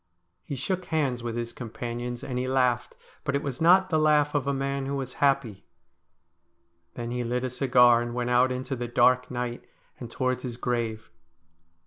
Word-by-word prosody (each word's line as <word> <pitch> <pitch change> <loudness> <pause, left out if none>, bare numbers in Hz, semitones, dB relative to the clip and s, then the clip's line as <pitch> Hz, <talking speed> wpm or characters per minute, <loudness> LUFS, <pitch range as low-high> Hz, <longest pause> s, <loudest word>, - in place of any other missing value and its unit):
He 140 - -5
shook 180 +8 -3
hands 140 -6 -1
with 115 -1 -4
his 120 0 -4
companions, 120 +1 -5
and 125 -2 -3
he 130 - -2
laughed, 125 -2 +1 0.3
but 140 - -1
it 140 - -1
was 135 -2 -5
not 185 +3 +5
the 155 - +3
laugh 150 -1 +3
of 145 -2 0
a - - +2
man 135 0 -2
who 140 - -2
was 130 -2 -4
happy. 135 -8 +1 1.3
Then 120 -1 -5
he 125 0 -2
lit 125 +1 -2
a 130 - -2
cigar 125 -2 +5
and 120 0 -4
went 125 0 -1
out 125 +1 +4
into 130 +1 -3
the 120 -1 -4
dark 125 +1 +3
night, 125 -1 -4 0.4
and 120 - -7
towards 130 +1 -1
his 120 -2 -5
grave. 115 -3 -3
125 Hz, 185 wpm, -27 LUFS, 120-140 Hz, 1.3 s, not